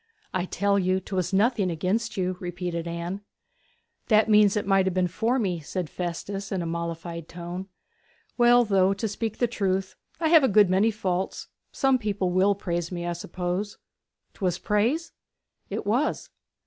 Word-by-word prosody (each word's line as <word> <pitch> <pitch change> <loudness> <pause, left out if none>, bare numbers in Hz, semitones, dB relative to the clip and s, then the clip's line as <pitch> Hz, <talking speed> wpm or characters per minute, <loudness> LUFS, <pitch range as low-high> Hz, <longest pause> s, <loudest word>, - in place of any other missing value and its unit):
'I 185 -1 0
tell 200 +1 +1
you 185 0 +1
'twas 185 -1 -3
nothing 205 0 +2
against 195 +8 -1
you,' 185 -1 0
repeated 175 -1 -4
Anne. 170 +3 -4 0.9
'That 215 0 +4
means 210 -1 +5
it 210 - -1
might 195 -1 +3
have 185 - -1
been 185 -1 +2
for 225 +8 0
me,' 185 -8 -1
said 165 +2 -5
Festus, 195 +3 -4
in 185 -3 -1
a - - -4
mollified 170 0 -4
tone. 175 +2 -6 0.7
'Well, 240 0 +5
though, 195 -2 +3
to 220 +3 -2
speak 220 +1 -3
the 245 - +2
truth, 195 -5 -1 0.2
I 325 -2 +1
have 320 -3 +7
a - - +5
good 205 -3 +5
many 195 +4 +4
faults, 190 -4 -3 0.2
some 270 -1 +2
people 205 -4 -1
will 190 +3 +3
praise 175 -3 -3
me, 175 -1 -4
I 175 - -1
suppose. 180 +4 -4 0.6
'Twas 185 -4 -1
praise?' 235 +11 0 0.6
'It - - -4
was.' 245 +9 0
190 Hz, 165 wpm, -26 LUFS, 180-215 Hz, 0.9 s, have